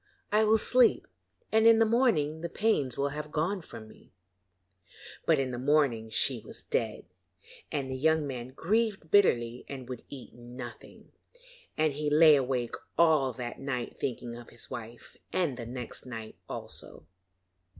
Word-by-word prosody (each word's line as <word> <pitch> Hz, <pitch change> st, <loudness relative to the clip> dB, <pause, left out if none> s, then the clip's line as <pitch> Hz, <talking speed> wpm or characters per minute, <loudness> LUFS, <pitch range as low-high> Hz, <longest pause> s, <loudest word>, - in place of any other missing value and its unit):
I 215 Hz, +1 st, +4 dB
will 220 Hz, +1 st, +5 dB
sleep, 245 Hz, +2 st, +4 dB, 0.5 s
and 220 Hz, +1 st, +5 dB
in 230 Hz, -1 st, +8 dB
the 225 Hz, -, +5 dB
morning 215 Hz, -, +2 dB
the 170 Hz, -, -3 dB
pains 155 Hz, -, 0 dB
will 140 Hz, 0 st, +1 dB
have 150 Hz, +1 st, -6 dB
gone 175 Hz, +6 st, -1 dB
from 110 Hz, -8 st, -11 dB
me.' 110 Hz, -, -18 dB, 1.2 s
But -, -, +5 dB
in 135 Hz, -1 st, -1 dB
the 120 Hz, -, -4 dB
morning 130 Hz, -5 st, +2 dB
she 120 Hz, +3 st, +2 dB
was -, -, -8 dB
dead, 110 Hz, -2 st, -2 dB, 0.7 s
and 140 Hz, -3 st, -2 dB
the -, -, -2 dB
young 160 Hz, +3 st, +2 dB
man 125 Hz, -3 st, -5 dB
grieved 195 Hz, -, -1 dB
bitterly 120 Hz, -12 st, +3 dB
and 130 Hz, -3 st, -7 dB
would 125 Hz, -2 st, -7 dB
eat 135 Hz, -3 st, -10 dB
nothing, 120 Hz, 0 st, -11 dB, 0.7 s
and 155 Hz, -2 st, +2 dB
he 150 Hz, +1 st, -1 dB
lay 155 Hz, +1 st, +7 dB
awake 125 Hz, -3 st, -1 dB, 0.2 s
all 155 Hz, -5 st, +4 dB
that 120 Hz, 0 st, -6 dB
night 125 Hz, -3 st, -4 dB
thinking 120 Hz, -2 st, -4 dB
of 120 Hz, 0 st, -11 dB
his 120 Hz, -, -8 dB
wife, 120 Hz, -1 st, -9 dB
and 170 Hz, -8 st, 0 dB
the 120 Hz, -2 st, -7 dB
next 125 Hz, +1 st, -7 dB
night 115 Hz, -3 st, -7 dB
also. -, -, -8 dB
140 Hz, 160 wpm, -29 LUFS, 120-160 Hz, 1.2 s, in